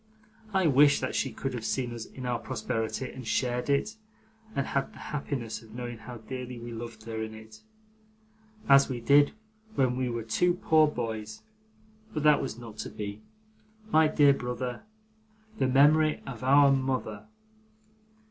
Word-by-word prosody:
I 190 -2 +2
wish 145 -1 +5
that - - -3
she - - 0
could 135 -1 -4
have 120 -3 -5
seen 120 0 -2
us 115 -1 -6
in 130 - -9
our 120 -1 -1
prosperity, 115 +3 -3
and 130 -3 -9
shared 125 +2 0
it, 175 +11 +1 0.6
and 140 - 0
had 135 0 -2
the - - -14
happiness 130 -7 -4
of 110 -1 -15
knowing 120 -2 -6
how 120 +2 -9
dearly 125 +2 -7
we 120 0 -8
loved 115 -1 -8
her 110 0 -5
in 110 0 -5
it, 110 0 -13 1.1
as 140 0 +6
we 125 -2 -3
did 145 +4 +5 0.4
when 130 -2 +2
we 130 -1 -1
were 115 -1 -3
two 175 +11 +2
poor 155 -3 +4
boys; 110 -6 -5 0.7
but 155 - -1
that 150 -1 +5
was 130 -4 -4
not 115 -3 -10
to - - -4
be. 105 0 -6 0.7
My 160 -2 +5
dear 145 -2 +5
brother 125 -1 -4 0.8
The 130 - +3
Memory 150 +4 +4
of 125 -3 -7
our 140 +1 +6
Mother. 130 -6 -1
125 Hz, 165 wpm, -28 LUFS, 115-140 Hz, 1.1 s, as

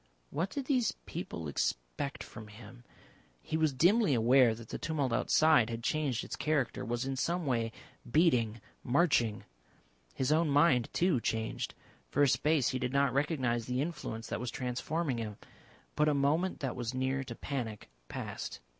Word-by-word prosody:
What 170 +6 -1
did 280 +3 -4
these 255 -5 +2
people 85 - -5
expect - - -2
from 110 -1 -10
him. 115 +3 -13 0.6
He 110 - -4
was 160 -2 +3
dimly 175 - +4
aware 120 0 +5
that 115 0 -11
the - - -5
tumult 145 -6 -1
outside 150 -2 +4
had 115 0 -5
changed 140 -4 0
its - - -5
character, 150 -5 0
was 120 +2 -2
in 135 0 -2
some 170 +5 -1
way 115 -4 0 0.4
beating, 120 -8 +3 0.2
marching. 120 -6 +2 0.7
His 130 +2 0
own 160 0 +3
mind, 140 -4 +4
too, 175 -7 +2
changed. 110 0 -2 0.3
For 145 - +3
a - - +6
space 150 0 +2
he 130 - -2
did 125 0 -2
not 140 -2 +3
recognise 130 -5 0
the 125 0 -1
influence 135 -7 -4
that - - -2
was 125 +1 -3
transforming 130 +3 -2
him. 105 -2 -5 0.6
But 150 0 +3
a 150 - +2
moment 155 +7 +1
that 135 -3 -2
was 120 0 -3
near 130 +1 0
to 120 -3 -7
panic 115 -7 -4 0.2
passed. - - -5
130 Hz, 165 wpm, -32 LUFS, 115-155 Hz, 0.7 s, a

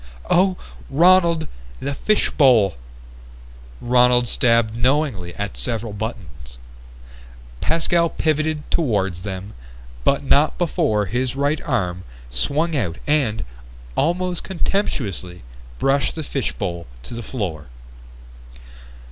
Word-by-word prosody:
"Oh, 185 +1 +4 0.3
Ronald! 170 +1 +4 0.3
The 140 +1 -3
fishbowl!" 130 - +3 1.1
Ronald 125 0 +4
stabbed 115 -3 +2
knowingly 120 - 0
at 100 -10 -4
several 110 - -3
buttons. 75 - -7 1.0
Pascal 170 +1 +2
pivoted 155 -1 0
toward 105 - +1
them, 95 +1 -6 0.5
but 140 - +2
not 145 +2 +3
before 155 - +1
his 125 +5 -1
right 145 +2 0
arm 90 -1 -1 0.3
swung 150 - 0
out 95 - -1
and, 130 -8 +1 0.5
almost 175 +3 0
contemptuously, 110 - -2 0.3
brushed 135 - +1
the 160 - -4
fishbowl 90 - -3 0.2
to - - -9
the 120 - -5
floor. 90 - -4
125 Hz, 95 wpm, -21 LUFS, 100-155 Hz, 1.1 s, Oh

